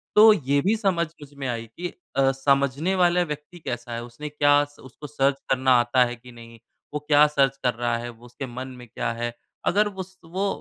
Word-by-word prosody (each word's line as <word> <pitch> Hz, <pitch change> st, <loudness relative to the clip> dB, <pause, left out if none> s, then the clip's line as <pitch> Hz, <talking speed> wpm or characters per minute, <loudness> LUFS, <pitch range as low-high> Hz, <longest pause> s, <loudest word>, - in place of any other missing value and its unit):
तो 215 Hz, +1 st, +9 dB
ये 140 Hz, -6 st, +1 dB
भी 200 Hz, +7 st, +2 dB
समझ 185 Hz, -6 st, +1 dB
मुझ 145 Hz, 0 st, -12 dB
में 140 Hz, -1 st, -5 dB
आई, 115 Hz, -2 st, -3 dB
कि 180 Hz, -, -3 dB, 0.3 s
अ, 135 Hz, 0 st, +4 dB
समझने 140 Hz, +6 st, +1 dB
वाला 180 Hz, -1 st, +3 dB
व्यक्ति 150 Hz, +2 st, -7 dB
कैसा 120 Hz, -4 st, -5 dB
है? 120 Hz, -, -4 dB
उसने 120 Hz, +6 st, -8 dB
क्या 145 Hz, 0 st, +4 dB
स 145 Hz, 0 st, -12 dB
उसको 130 Hz, +3 st, -11 dB
सर्च 140 Hz, -1 st, 0 dB
करना 130 Hz, 0 st, +2 dB
आता 120 Hz, +1 st, +3 dB
है 120 Hz, 0 st, -4 dB
कि 125 Hz, +1 st, -15 dB
नहीं? 115 Hz, -1 st, -13 dB, 0.3 s
वो 150 Hz, -, -1 dB
क्या 150 Hz, 0 st, +7 dB
सर्च 135 Hz, -2 st, +2 dB
कर 125 Hz, -, +2 dB
रहा 120 Hz, 0 st, -1 dB
है? 120 Hz, +1 st, -5 dB
वो 120 Hz, 0 st, -14 dB
उसके 125 Hz, +3 st, -7 dB
मन 130 Hz, +1 st, -6 dB
में 120 Hz, -, -11 dB
क्या 110 Hz, -, -3 dB
है? 120 Hz, 0 st, -2 dB, 0.3 s
अगर 210 Hz, +3 st, +3 dB
उस 190 Hz, -2 st, -8 dB
वो 190 Hz, +5 st, -2 dB
140 Hz, 220 wpm, -24 LUFS, 120-165 Hz, 0.3 s, तो